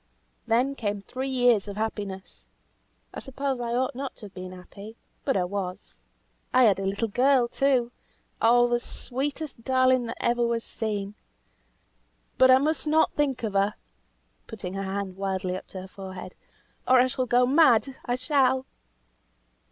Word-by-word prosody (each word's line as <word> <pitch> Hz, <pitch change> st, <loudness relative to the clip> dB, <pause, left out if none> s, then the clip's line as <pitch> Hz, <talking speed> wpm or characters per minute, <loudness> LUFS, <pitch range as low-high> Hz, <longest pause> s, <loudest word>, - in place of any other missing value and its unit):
Then 250 Hz, +5 st, +2 dB
came 205 Hz, -6 st, -3 dB
three 260 Hz, +5 st, -5 dB
years 245 Hz, -5 st, +3 dB
of 200 Hz, 0 st, -6 dB
happiness. 205 Hz, -3 st, -5 dB, 0.7 s
I -, -, -6 dB
suppose 270 Hz, -1 st, -3 dB
I 235 Hz, 0 st, -2 dB
ought 260 Hz, +3 st, 0 dB
not 270 Hz, +1 st, -5 dB
to 215 Hz, -, -12 dB
have 200 Hz, -, -12 dB
been 185 Hz, 0 st, -7 dB
happy, 200 Hz, +4 st, -11 dB, 0.3 s
but 270 Hz, -, +1 dB
I 185 Hz, -, +1 dB
was. 185 Hz, 0 st, -5 dB, 0.5 s
I 255 Hz, -, +5 dB
had 200 Hz, -5 st, +4 dB
a 195 Hz, -, -2 dB
little 200 Hz, +4 st, -1 dB
girl, 250 Hz, +3 st, +3 dB
too. 255 Hz, -2 st, +1 dB, 0.5 s
Oh! 240 Hz, +1 st, +5 dB
the 240 Hz, 0 st, +1 dB
sweetest 275 Hz, +2 st, -5 dB
darling 255 Hz, -1 st, +3 dB
that 230 Hz, -, -6 dB
ever 240 Hz, 0 st, +1 dB
was 235 Hz, -1 st, 0 dB
seen! 205 Hz, -2 st, -4 dB, 1.3 s
But 260 Hz, -, +7 dB
I 255 Hz, -, +8 dB
must 290 Hz, 0 st, -1 dB
not 315 Hz, +1 st, +3 dB
think 275 Hz, -5 st, -1 dB
of 215 Hz, -3 st, -2 dB
her," 200 Hz, +1 st, +1 dB, 0.7 s
putting 195 Hz, -5 st, -7 dB
her 195 Hz, -, -3 dB
hand 195 Hz, -1 st, -4 dB
wildly 190 Hz, -1 st, -2 dB
up 185 Hz, -, -8 dB
to 190 Hz, -, -8 dB
her 190 Hz, -, -9 dB
forehead, 190 Hz, -1 st, -9 dB, 0.5 s
"or 255 Hz, 0 st, +6 dB
I 250 Hz, -, +6 dB
shall 255 Hz, 0 st, -2 dB
go 245 Hz, +1 st, +4 dB
mad; 270 Hz, -2 st, +4 dB
I 245 Hz, -, -1 dB
shall." 260 Hz, -1 st, +2 dB
235 Hz, 165 wpm, -26 LUFS, 200-260 Hz, 1.3 s, I